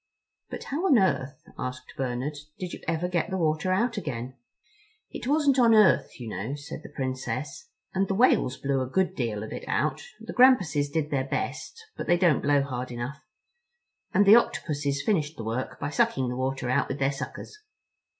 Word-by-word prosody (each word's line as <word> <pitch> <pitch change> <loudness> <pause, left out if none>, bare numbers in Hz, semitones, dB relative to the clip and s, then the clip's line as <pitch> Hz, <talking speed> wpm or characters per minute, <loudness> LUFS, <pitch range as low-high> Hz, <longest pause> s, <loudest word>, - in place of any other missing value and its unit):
"But - - -6
how 320 +8 -1
on 275 - +6
earth," 140 - 0 0.2
asked 130 0 -6
Bernard, 130 +3 -2 0.2
"did 180 -2 -5
you - - -7
ever 165 +1 0
get 180 +1 -1
the 190 - -2
water 155 +1 0
out 230 +5 +1
again?" 130 - -4 0.8
"It - - -6
wasn't 285 -2 +3
on 230 -2 +6
earth, 210 -9 +4
you 120 - -6
know," 110 +5 -4
said 145 +1 -8
the - - -11
Princess, 130 - -4 0.2
"and 195 +1 +1
the 195 - -1
Whales 205 - +3
blew 135 -1 0
a 130 - -2
good 190 +6 +1
deal 110 -4 -2
of 110 - -7
it - - -6
out—the 485 0 -3
Grampuses 185 - +4
did 155 -1 -1
their 135 -2 0
best, 450 - -4
but - - -6
they 175 - +4
don't 175 -5 +3
blow 145 -1 +3
hard 130 -2 -4
enough. 120 +4 -5 0.9
And 205 +2 +4
the 210 +3 +9
Octopuses 145 -10 -1
finished 160 -8 0
the 115 - -5
work 115 +4 -3
by 145 - -3
sucking 130 -3 +1
the 125 - -3
water 130 0 -2
out 130 +3 +1
with 135 - -4
their 135 -1 +1
suckers." 140 - -7
145 Hz, 190 wpm, -27 LUFS, 130-190 Hz, 0.9 s, the